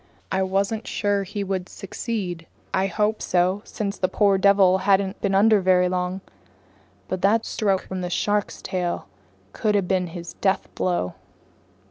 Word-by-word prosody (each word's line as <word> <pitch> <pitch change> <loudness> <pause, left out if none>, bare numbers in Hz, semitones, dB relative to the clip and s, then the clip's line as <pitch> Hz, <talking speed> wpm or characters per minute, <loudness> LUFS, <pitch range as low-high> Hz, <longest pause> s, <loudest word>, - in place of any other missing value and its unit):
I 190 - +1
wasn't 195 +4 -1
sure 205 -1 0
he 200 +1 -4
would 190 -2 -3
succeed. 185 -4 -5 0.3
I 190 +1 +2
hoped 210 +3 0
so, 185 +3 +1
since 200 -2 -4
the 185 - +2
poor 195 0 +3
devil 195 -1 +5
hadn't 195 0 +1
been 195 -1 +1
under 210 +1 +5
very 180 -1 +4
long. 180 +1 -2 0.9
But 185 -1 -3
that 220 +3 +3
stroke 195 -3 0
from 190 -1 -5
the 180 - -3
shark's 205 +3 -1
tail 180 -2 -2 0.5
could 210 -1 0
have 195 -3 +1
been 185 -1 +1
his 170 0 -8
deathblow. 185 - 0
190 Hz, 150 wpm, -24 LUFS, 185-205 Hz, 0.9 s, devil